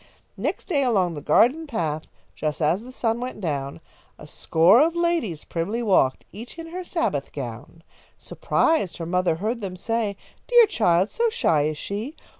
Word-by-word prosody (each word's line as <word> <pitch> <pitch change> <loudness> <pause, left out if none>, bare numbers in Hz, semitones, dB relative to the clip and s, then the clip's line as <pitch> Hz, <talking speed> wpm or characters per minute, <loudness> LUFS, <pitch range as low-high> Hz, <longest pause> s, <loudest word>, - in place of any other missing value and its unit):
_" - - -26 0.3
Next - - -3
day 295 -7 +1
along 195 -9 +1
the 145 - -6
garden 290 - +3
path, 160 - -2 0.3
Just 150 -1 -3
as 165 +5 +1
the 250 +2 -11
sun 230 -2 -1
went 250 -2 -5
down, 140 -5 -3 0.4
A - - -12
score 170 - +4
of 330 +2 +2
ladies 340 - 0
primly 200 +8 -3
walked, 185 - +2
Each 230 - -10
in 330 0 -8
her 365 +2 -5
Sabbath 325 - -2
gown. 135 +5 -8 0.3
Surprised, 315 - 0
her 165 - -5
mother 180 -1 +1
heard 220 +7 -3
them 190 -3 -5
say, 215 +1 -2 0.3
"Dear 485 -2 +7
child! 185 - +2
So 470 0 +1
shy 160 - +1
is 155 -1 -3
she! 215 - -5
200 Hz, 175 wpm, -24 LUFS, 165-255 Hz, 0.4 s, Dear